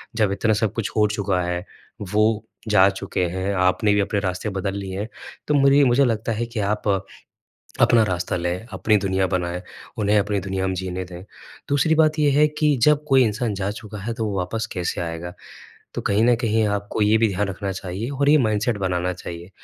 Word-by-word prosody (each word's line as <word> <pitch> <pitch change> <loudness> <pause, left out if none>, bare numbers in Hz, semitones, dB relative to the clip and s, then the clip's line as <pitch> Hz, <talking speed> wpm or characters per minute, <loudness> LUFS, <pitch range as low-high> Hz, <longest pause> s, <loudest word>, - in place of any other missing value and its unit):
जब 105 -4 +2
इतना 110 +2 +1
सब 110 -3 0
कुछ 115 -4 -2
हो 105 -1 +4
चुका 100 -3 -1
है, 90 +1 -3 0.4
वो 105 +2 +1 0.3
जा 100 -2 +6
चुके 95 -1 -2
हैं 95 +3 -2
आपने 95 +3 +2
भी 105 - +2
अपने 100 +1 -1
रास्ते 95 +2 -2
बदल 95 0 -3
लिए 95 -1 -5
हैं। 105 - -3 0.4
तो 150 - +1
मुरी 140 0 +5
मुझे 130 +1 +4
लगता 115 -1 -1
है 115 +2 -2
कि 115 -1 -6
आप 105 +1 -1 0.9
अपना 115 -2 +5
रास्ता 90 -4 -2
लें 90 +4 -3
अपनी 110 - +2
दुनिया 95 -1 0
बनाएँ 90 -1 -2 0.4
उन्हें 105 0 +2
अपनी 105 0 0
दुनिया 95 0 -2
में 95 - -1
जीने 95 0 -4
दें। 90 0 -10 0.5
दूसरी 145 +3 +3
बात 155 0 +3
ये 145 -1 +4
है 150 +2 +4
कि 150 -1 +1
जब 150 +1 +4
कोई 135 -2 +5
इंसान 110 +1 -1
जा 95 0 -2
चुका 105 -1 -9
है 115 +4 -3
तो 115 -1 -3
वो 100 -2 -2
वापस 95 +5 -2
कैसे 90 -2 -2
आएगा? 85 +1 -5 0.6
तो - - -2
कहीं 105 +3 +2
न 120 0 +5
कहीं 110 -2 +1
आपको 100 +1 -2
ये 105 +1 +4
भी 115 0 +3
ध्यान 100 +1 -1
रखना 95 +1 -4
चाहिए 95 +5 -5
और 140 0 0
ये 150 - +7
माइंडसेट 110 -2 +1
बनाना 90 -2 -1
चाहिए। 85 0 -8
105 Hz, 210 wpm, -22 LUFS, 95-115 Hz, 0.9 s, ये